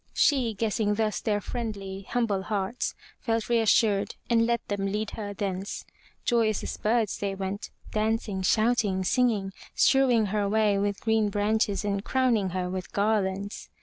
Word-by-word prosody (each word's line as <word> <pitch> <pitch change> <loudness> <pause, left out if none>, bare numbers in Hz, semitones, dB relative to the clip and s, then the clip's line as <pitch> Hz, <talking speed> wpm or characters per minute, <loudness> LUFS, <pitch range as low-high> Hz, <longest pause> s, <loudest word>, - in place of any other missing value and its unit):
She, 250 -7 +3
guessing 210 0 0
thus 215 -1 0
their 210 -2 0
friendly, 200 -4 -5
humble 225 -6 0
hearts, 200 +3 -2 0.2
felt 225 -3 -1
reassured 220 -3 +3 0.2
and 230 -1 +4
let 235 -1 -1
them 200 -1 -1
lead 210 +2 -2
her 205 -2 -5
thence. 195 0 -4 0.4
Joyous 225 -3 +2
as - - -4
birds 220 -1 +1
they 200 -1 -2
went, 195 +1 -4 0.2
dancing, 215 -2 -1
shouting, 215 -1 +2
singing, 210 -3 +1 0.2
strewing 255 -5 +4
her 205 -2 +1
way 210 -1 +2
with 200 0 -1
green 220 -2 +2
branches 205 0 0
and 200 -1 -1
crowning 240 -7 +1
her 180 0 -2
with 185 0 -5
garlands. 200 -1 -1
210 Hz, 150 wpm, -27 LUFS, 195-225 Hz, 0.4 s, and